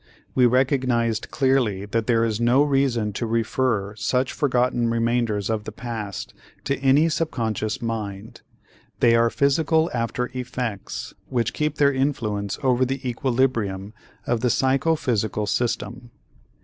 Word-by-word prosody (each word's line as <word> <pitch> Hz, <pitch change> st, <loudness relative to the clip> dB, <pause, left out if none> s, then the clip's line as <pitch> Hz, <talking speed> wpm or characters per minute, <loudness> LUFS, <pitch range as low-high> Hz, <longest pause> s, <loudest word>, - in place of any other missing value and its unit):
We 125 Hz, -1 st, +5 dB
recognized 125 Hz, -3 st, +1 dB
clearly 130 Hz, -8 st, +1 dB
that 110 Hz, +2 st, -2 dB
there 115 Hz, -2 st, +3 dB
is 110 Hz, 0 st, -2 dB
no 120 Hz, +4 st, +4 dB
reason 135 Hz, -7 st, +1 dB
to 115 Hz, -, -3 dB
refer 115 Hz, -2 st, 0 dB
such 125 Hz, +4 st, 0 dB
forgotten 125 Hz, -4 st, +1 dB
remainders 115 Hz, -3 st, 0 dB
of 110 Hz, -2 st, -1 dB
the -, -, -5 dB
past 110 Hz, -4 st, -6 dB, 0.3 s
to 140 Hz, -, 0 dB
any 135 Hz, +4 st, +4 dB
subconscious 115 Hz, -10 st, -2 dB
mind; 110 Hz, -2 st, -5 dB, 0.6 s
they 115 Hz, -, +5 dB
are 115 Hz, 0 st, +4 dB
physical 160 Hz, +5 st, +2 dB
after 125 Hz, +1 st, -2 dB
effects 125 Hz, -5 st, -4 dB, 0.2 s
which 120 Hz, -4 st, 0 dB
keep 150 Hz, 0 st, -1 dB
their 140 Hz, -1 st, +3 dB
influence 110 Hz, -7 st, -1 dB
over 130 Hz, -1 st, +3 dB
the 130 Hz, +1 st, -2 dB
equilibrium 115 Hz, -6 st, -1 dB, 0.3 s
of 120 Hz, -2 st, 0 dB
the 125 Hz, -, +2 dB
psychophysical 130 Hz, -6 st, +1 dB
system. 120 Hz, +2 st, -2 dB
120 Hz, 130 wpm, -23 LUFS, 110-130 Hz, 0.6 s, We